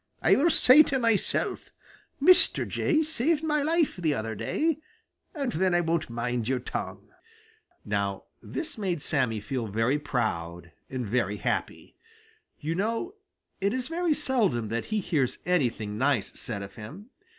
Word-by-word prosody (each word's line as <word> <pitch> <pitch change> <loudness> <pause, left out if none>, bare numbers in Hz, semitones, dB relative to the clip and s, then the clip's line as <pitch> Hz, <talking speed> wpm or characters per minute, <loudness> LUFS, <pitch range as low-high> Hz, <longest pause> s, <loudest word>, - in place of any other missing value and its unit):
I - - +5
will 320 +5 +4
say 285 -2 +7
to 280 -3 +1
myself, 230 -5 0 0.5
'Mr. 360 +6 +5
Jay 315 -2 +1
saved 310 +1 0
my 300 -2 +1
life 320 - +1
the 160 -5 0
other 110 -1 -3
day,' 310 - -1 0.6
and 275 -5 -1
then 185 0 +1
I 175 - +4
won't 165 -3 -1
mind 120 0 -2
your 130 0 +1
tongue." 125 - -6 0.8
Now 100 -2 -1 0.2
this 320 -7 -5
made 180 -7 -2
Sammy 125 -7 0
feel 115 +2 -3
very 115 +8 +1
proud 85 - -3 0.2
and 130 -2 -3
very 105 -2 0
happy. - - -3 0.6
You 155 +2 -2
know 230 - -2 0.5
it 200 +2 +1
is 255 +1 -2
very 335 -1 +1
seldom 210 - +1
that 115 +1 -2
he 215 -1 -1
hears 150 -8 0
anything 115 -11 0
nice 130 -6 +1
said 105 -4 -5
of 100 0 -9
him. 170 - -10
160 Hz, 150 wpm, -27 LUFS, -, 0.8 s, say